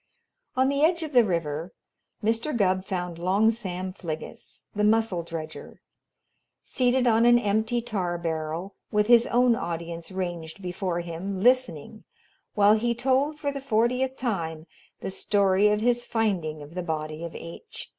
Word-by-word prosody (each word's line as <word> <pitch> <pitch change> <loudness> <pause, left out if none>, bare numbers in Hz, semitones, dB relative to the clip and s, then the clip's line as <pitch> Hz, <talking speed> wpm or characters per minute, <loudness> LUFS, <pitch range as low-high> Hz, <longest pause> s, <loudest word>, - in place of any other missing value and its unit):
On 260 +1 +3
the 280 +1 0
edge 335 +2 +3
of 310 - -5
the 245 -2 +7
river, 170 -3 -2 0.5
Mr. 230 +5 0
Gubb 185 -2 +2
found 180 -3 -4
Long 195 +5 +3
Sam 185 -4 -4
Fliggis, 160 -4 -7
the 210 - 0
mussel 215 -4 +2
dredger, 160 -1 -8 0.8
seated 255 0 +2
on 230 -1 +4
an 240 0 +7
empty 220 +2 0
tar 185 -7 -2
barrel 165 +2 -3 0.2
with 210 0 +3
his 235 +1 +6
own 245 0 +4
audience 170 -1 -5
ranged 175 -3 -4
before 180 -1 -3
him 175 +3 -5
listening 225 - +1 0.5
while 205 0 +6
he 235 +2 +1
told, 265 +5 +1
for 285 -1 -2
the 280 -1 -6
fortieth 255 +1 +1
time, 165 -10 -3 0.4
the - - -4
story 200 0 +3
of 210 0 +2
his 240 +1 +2
finding 180 -11 -1
of 145 +3 -12
the 180 - -3
body 155 -1 -4
of 170 - -6
H. 170 - -9
200 Hz, 155 wpm, -26 LUFS, 170-240 Hz, 0.8 s, the